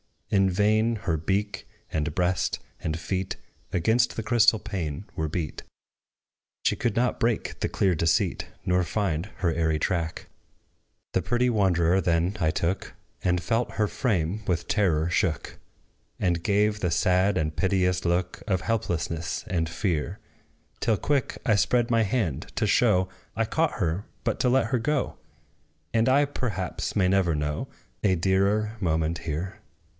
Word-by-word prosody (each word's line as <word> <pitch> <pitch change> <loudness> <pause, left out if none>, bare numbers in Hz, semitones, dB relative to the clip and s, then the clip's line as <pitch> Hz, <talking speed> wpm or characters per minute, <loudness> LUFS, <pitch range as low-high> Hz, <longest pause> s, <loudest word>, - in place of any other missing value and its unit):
In 95 -1 +4
vain 110 +4 +2
her 95 -6 -1
beak, 95 +5 -2 0.2
and 75 -1 -1
breast, 90 +1 +1 0.2
and 80 0 -2
feet 95 +2 -2 0.4
Against 110 +8 +2
the 115 - -3
crystal 110 0 +4
pane 95 -6 -4
were 80 - -1
beat: 80 -1 -3 1.0
She - - +2
could 120 -4 0
not 125 +1 +1
break 115 -1 0
the - - -1
clear 95 -2 +2
deceit, 85 +1 +1 0.2
Nor 90 0 +2
find 90 -2 -1
her 85 -3 +1
airy 80 -1 +1
track. 85 -1 -2 0.9
The - - +2
pretty 120 +1 +1
wanderer 95 -4 +3
then 85 +2 +1
I 80 - +2
took; 85 +4 -2 0.3
And 90 -1 +1
felt 115 +6 0
her 105 -1 +1
frame 100 -5 -1
with 85 -2 0
terror 85 -7 +2
shook: 85 -3 -1 0.6
She 90 - +2
gave 105 +5 +1
the 90 -4 0
sad 95 +3 +3
and 75 -2 -1
piteous 90 +1 +1
look 90 +1 0
Of 95 -4 +1
helplessness 85 -5 -2
and 80 -3 0
fear; 85 -4 -1 0.6
Till 110 -2 +2
quick 140 +2 0
I 110 -5 +4
spread 120 +3 +2
my 115 -1 +4
hand, 95 - -1
to 115 - +1
show, 100 -3 +3 0.3
I 115 - +1
caught 160 +7 +1
her 90 0 -1 0.2
but - - -1
to 125 - +3
let 130 -2 +3
her 125 +1 0
go; 150 +3 -1 0.8
And 115 +2 +3
I, 140 +3 +5
perhaps, 115 - -3
may 95 -3 +3
never 95 -4 +2
know 75 0 -2 0.3
A 95 -3 +3
dearer 100 +5 +1
moment 80 -3 0
here. 85 +4 -4
95 Hz, 150 wpm, -26 LUFS, 85-110 Hz, 1.0 s, I